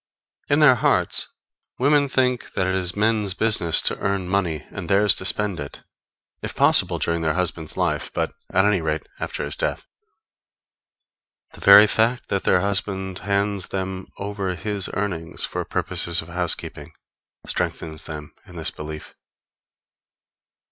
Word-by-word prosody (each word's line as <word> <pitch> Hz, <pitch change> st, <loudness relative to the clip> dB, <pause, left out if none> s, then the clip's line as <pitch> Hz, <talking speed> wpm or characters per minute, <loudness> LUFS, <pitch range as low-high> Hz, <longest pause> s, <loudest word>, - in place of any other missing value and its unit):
In 145 Hz, +2 st, +3 dB
their 145 Hz, -4 st, +8 dB
hearts, 120 Hz, -, +1 dB, 0.5 s
women 145 Hz, +1 st, +3 dB
think 125 Hz, -2 st, 0 dB
that 95 Hz, -, 0 dB
it 95 Hz, -, 0 dB
is 90 Hz, -2 st, 0 dB
men's 105 Hz, -2 st, +1 dB
business 105 Hz, -7 st, +3 dB
to -, -, 0 dB
earn 100 Hz, -2 st, -1 dB
money 90 Hz, -5 st, -1 dB
and 95 Hz, -4 st, -7 dB
theirs 100 Hz, +1 st, +6 dB
to 95 Hz, -, -4 dB
spend 100 Hz, -2 st, +1 dB
it 70 Hz, -1 st, -8 dB, 0.6 s
if -, -, -5 dB
possible -, -, +4 dB
during 85 Hz, 0 st, -1 dB
their 80 Hz, 0 st, 0 dB
husband's 85 Hz, -3 st, -3 dB
life, -, -, -1 dB
but, -, -, -2 dB, 0.2 s
at 95 Hz, -, +3 dB
any 105 Hz, -4 st, +2 dB
rate, 80 Hz, -1 st, -2 dB, 0.2 s
after -, -, -4 dB
his 75 Hz, -, -3 dB
death. -, -, -2 dB, 1.7 s
The -, -, -14 dB
very 100 Hz, +1 st, +9 dB
fact 115 Hz, +3 st, 0 dB
that 100 Hz, -, -1 dB
their 90 Hz, -, +3 dB
husband 95 Hz, -1 st, -2 dB
hands 100 Hz, -1 st, 0 dB
them 95 Hz, -1 st, -4 dB
over 100 Hz, -2 st, -3 dB
his 100 Hz, 0 st, -2 dB
earnings 90 Hz, -5 st, -2 dB
for -, -, -4 dB
purposes 85 Hz, 0 st, 0 dB
of 80 Hz, -, -14 dB
housekeeping, 85 Hz, 0 st, -2 dB, 0.5 s
strengthens 80 Hz, -1 st, -3 dB
them 75 Hz, -2 st, -8 dB
in -, -, -14 dB
this -, -, -1 dB
belief. 75 Hz, 0 st, -8 dB
95 Hz, 150 wpm, -22 LUFS, 85-105 Hz, 1.7 s, very